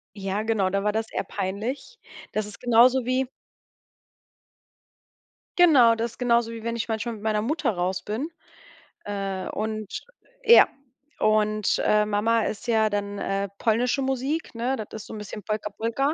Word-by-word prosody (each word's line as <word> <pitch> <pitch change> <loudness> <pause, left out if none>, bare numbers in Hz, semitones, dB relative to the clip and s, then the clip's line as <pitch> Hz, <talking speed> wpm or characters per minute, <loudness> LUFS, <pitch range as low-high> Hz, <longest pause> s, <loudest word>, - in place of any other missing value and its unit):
Ja, 195 +1 -2
genau, 215 -4 +1
da 195 +1 -1
war 210 - +2
das 220 +1 -2
eher - - -2
peinlich. 220 - -4 0.4
Das 215 -1 -1
ist 210 - -11
genauso 245 +2 +5
wie 255 +1 +1 2.3
Genau, 275 -10 +7
das 230 0 -2
ist - - -19
genauso, 235 -2 +2
wie 225 -1 -8
wenn 230 0 -2
ich 230 - -3
manchmal 225 +1 -2
mit 210 - -12
meiner 215 -1 +1
Mutter 295 -1 0
raus 185 0 -2
bin, 245 +10 -3 0.8
äh, 195 -2 -3
und 215 -1 -3 0.6
ja, 470 +1 +8 0.5
und, 215 -1 +2
äh, 210 0 +3
Mama 215 +2 +1
ist 215 +3 -4
ja 220 -2 +3
dann, 205 0 -3
äh, 195 0 -1
polnische 245 +4 +1
Musik, 270 +4 -2
ne? 240 +3 -1
Das 215 -4 -6 0.2
ist - - -14
so - - -9
'n - - -6
bisschen 210 -1 -7
Polka 215 0 -3
Polka. 235 +8 -1
220 Hz, 165 wpm, -25 LUFS, 210-240 Hz, 2.3 s, ja